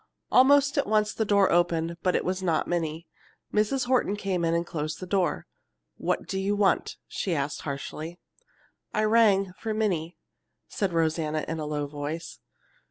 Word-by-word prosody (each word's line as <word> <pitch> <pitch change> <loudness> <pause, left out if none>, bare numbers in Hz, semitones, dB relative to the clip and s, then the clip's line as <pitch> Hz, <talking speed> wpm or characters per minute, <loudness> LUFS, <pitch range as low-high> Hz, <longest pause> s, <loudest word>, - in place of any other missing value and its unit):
Almost 280 +2 +5
at 280 - 0
once 210 -1 +2
the 220 - -1
door 200 -1 +4
opened; 170 -1 +1
but 180 - +1
it - - 0
was 185 +1 -1
not 170 -4 0
Minnie. 165 -1 -2 0.5
Mrs. 215 +6 +1
Horton 245 -5 +2
came 190 -4 -2
in 165 0 +2
and 170 0 0
closed 155 -2 -4
the 185 - -6
door. 180 -4 0 0.5
"What - - -1
do 190 - -3
you 200 +2 0
want?" 200 -3 +1
she 180 -4 -2
asked 145 0 -2
harshly. 155 +4 -5 0.8
"I 215 - +2
rang 210 -4 +4
for 220 -1 -3
Minnie," 180 -6 -1 0.5
said 195 -3 -2
Rosanna 160 -2 0
in 165 0 -3
a 150 - -3
low 150 -1 -2
voice. 150 +3 -6
180 Hz, 165 wpm, -27 LUFS, 160-210 Hz, 0.8 s, Almost